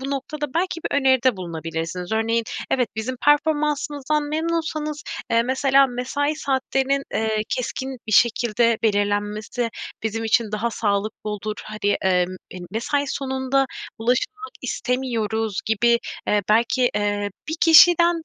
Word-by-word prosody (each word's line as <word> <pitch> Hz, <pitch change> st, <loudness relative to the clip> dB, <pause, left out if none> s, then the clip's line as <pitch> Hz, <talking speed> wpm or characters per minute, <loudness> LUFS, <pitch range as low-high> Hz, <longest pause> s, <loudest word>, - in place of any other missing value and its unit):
Bu 270 Hz, +1 st, -4 dB
noktada 290 Hz, +1 st, -4 dB
belki 345 Hz, 0 st, -1 dB
bir -, -, 0 dB
öneride 260 Hz, -4 st, +3 dB
bulunabilirsiniz. 170 Hz, +1 st, -5 dB
Örneğin, 225 Hz, +1 st, +1 dB, 0.3 s
"Evet, 250 Hz, -4 st, +2 dB
bizim 250 Hz, +4 st, -3 dB
performansımızdan 295 Hz, -1 st, +1 dB
memnunsanız, 310 Hz, -1 st, -2 dB, 0.3 s
eee, 230 Hz, 0 st, +4 dB
mesela 270 Hz, +2 st, +3 dB
mesai 275 Hz, +4 st, -2 dB
saatlerinin, 270 Hz, -1 st, 0 dB
eee, 220 Hz, -1 st, 0 dB
keskin 260 Hz, +1 st, -4 dB
bir 215 Hz, -, -3 dB
şekilde 235 Hz, 0 st, +3 dB
belirlenmesi 210 Hz, +3 st, 0 dB, 0.3 s
bizim 225 Hz, +1 st, -2 dB
için 220 Hz, -1 st, +1 dB
daha 220 Hz, +3 st, -1 dB
sağlıklı 210 Hz, 0 st, -2 dB
olur. 210 Hz, +1 st, -4 dB
Hani, 210 Hz, -1 st, -1 dB
eee, 180 Hz, -1 st, +3 dB, 0.3 s
m 180 Hz, -1 st, -8 dB
mesai 280 Hz, +6 st, -1 dB
sonunda 265 Hz, 0 st, 0 dB, 0.3 s
ulaşılmak 335 Hz, -, -1 dB
istemiyoruz." 225 Hz, -5 st, -1 dB
gibi, 235 Hz, +2 st, +3 dB, 0.3 s
eee, 210 Hz, -1 st, +2 dB
belki, 235 Hz, +3 st, +3 dB
eee, 205 Hz, 0 st, -1 dB, 0.2 s
bir 320 Hz, -, -2 dB
kişiden 340 Hz, 0 st, +6 dB
245 Hz, 125 wpm, -22 LUFS, 215-280 Hz, 0.3 s, kişiden